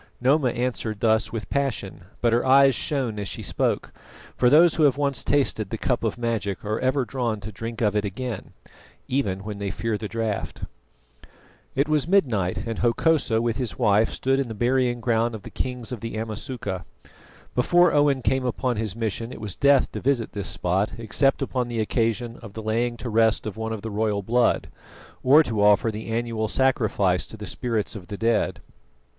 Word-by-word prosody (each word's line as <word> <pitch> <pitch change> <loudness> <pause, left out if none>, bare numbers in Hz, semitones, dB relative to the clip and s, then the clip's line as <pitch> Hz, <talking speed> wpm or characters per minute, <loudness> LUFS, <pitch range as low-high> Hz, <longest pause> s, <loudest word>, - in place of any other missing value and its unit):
Noma 130 +1 +3
answered 120 -3 -2
thus 110 0 +2
with 115 -2 -5
passion, 125 -11 -2 0.2
but 115 -1 +3
her 120 - +3
eyes 135 +1 +6
shone 125 -4 -1
as 100 - -4
she 75 - -6
spoke: - - -1 0.4
for 125 - +4
those 160 +4 +6
who 165 - -1
have 140 -2 +3
once 140 -2 0
tasted 130 -8 +1
the 115 - -3
cup 120 +1 -1
of 115 -1 -1
magic 115 -5 -2
are 110 +2 -1
ever 130 0 +1
drawn 120 -3 -2
to 105 - -7
drink 115 +2 -6
of 105 -2 +2
it 105 - +1
again, 110 +2 -5 0.5
even 100 -8 -1
when 105 -1 -6
they 100 -1 -2
fear 110 +2 -2
the 110 - -4
draught. 110 -1 -3 1.1
It 140 +2 +2
was 155 -1 +1
midnight, 120 - +2
and 115 -1 -4
Hokosa 120 -1 +2
with 115 -2 0
his 125 -4 -3
wife 105 +2 +3
stood 135 +1 0
in 135 - -1
the 110 - -6
burying 120 +1 +1
ground 115 -1 +1
of 105 - -9
the - - -10
kings 125 -2 -4
of 125 - -4
the 115 +1 -5
Amasuka. 110 -3 -4 0.7
Before 175 +8 +4
Owen 145 -3 +3
came 130 +1 +1
upon 125 -1 -1
his 110 -2 -2
mission 115 +1 -3
it - - -8
was 105 -4 -5
death 140 -2 +4
to - - -5
visit 130 -3 0
this 100 -2 -4
spot 95 +4 0
except 135 +4 +1
upon 125 -2 -2
the 120 -1 -3
occasion 115 +1 -1
of 110 -4 -11
the 110 - -7
laying 120 +2 0
to 125 - -6
rest 110 0 +3
of 110 - -4
one 110 0 -4
of 110 -2 -5
the 110 - -4
royal 105 -1 0
blood, 120 +3 +2 0.5
or 145 +5 +6
to 110 -7 -2
offer 105 +2 +4
the 110 +1 -7
annual 115 -1 -1
sacrifice 110 -8 +1
to 110 - -9
the 105 - -7
spirits 115 -2 -2
of 95 -4 -9
the 100 - -6
dead. 115 0 0
115 Hz, 195 wpm, -24 LUFS, 110-130 Hz, 1.1 s, eyes